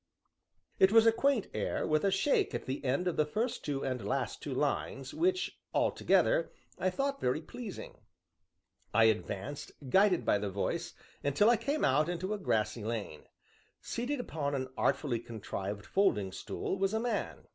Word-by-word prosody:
'" - - -53 0.3
It 190 - +6
was 225 0 +7
a 225 - +7
quaint 255 -1 +2
air, - - -1
with 155 0 +1
a 200 - +4
shake 195 +9 +2
at - - -4
the 130 +1 -4
end 140 +7 0
of 180 - -1
the 155 - +3
first 225 +10 -2
two 140 -2 -2
and 130 -4 -2
last 100 - -2
two - - -5
lines, 135 -1 -1
which, 370 +2 0 0.2
altogether, - - +2 0.3
I 185 - +2
thought 275 +8 -2
very 125 +4 +1
pleasing. 205 +5 -8 1.0
I 115 - +6
advanced, 110 +3 -1 0.2
guided 190 -2 +4
by 105 - +3
the 100 0 -2
voice, 100 +1 -2 0.3
until 145 - +4
I - - +5
came 290 +6 0
out 150 +4 +3
into 180 +4 -2
a 210 - -3
grassy 110 - 0
lane. 105 -8 -4 0.5
Seated 255 +4 -3
upon 145 -11 -2
an 130 -1 -3
artfully 125 -6 +1
contrived 105 -3 -5
folding 105 - +2
stool, 185 - -4
was 195 +2 +1
a - - +1
man. 240 +1 -2
155 Hz, 170 wpm, -32 LUFS, -, 1.0 s, was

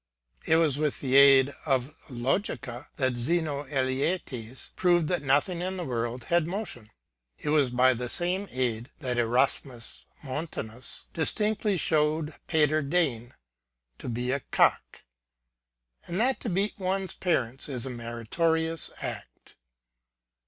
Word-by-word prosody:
*It 160 - +5
was 155 -4 +2
with 150 -2 -1
the 130 -1 -1
aid 140 0 +7
of 135 -1 0 0.2
logica 130 - -2
that 130 -3 0
2^no 145 +2 0
Eleates 130 -2 -2
proved 175 -3 +3
that 180 -1 0
nothing 145 +6 +1
in 185 +1 -3
the 175 - -4
world 120 -1 -3
had 170 +2 +1
motion. 175 - -5 0.5
'It - - -4
was 150 -4 +3
by 125 +1 +4
the 125 0 -4
same 180 +6 0
aid 120 -2 -2
that 125 -4 -2
Erasmus 120 0 -1 0.2
Montanus 130 -5 -4
dis 160 - +3
tinctly 210 -2 0
showed 155 0 +1
Peder 155 -2 +3
Degn 140 -6 0 0.7
to - - -6
be 120 +2 -2
a 140 - 0
cock, - - +1 1.1
and 175 - -3
that 255 +3 +2
to 230 - -4
beat 195 +3 0
oae's 190 0 -2
parents 135 -7 -1
is 125 -3 -3
a 130 - -4
meritorious 160 +8 +1
act. - - -7
140 Hz, 135 wpm, -27 LUFS, 125-170 Hz, 1.1 s, aid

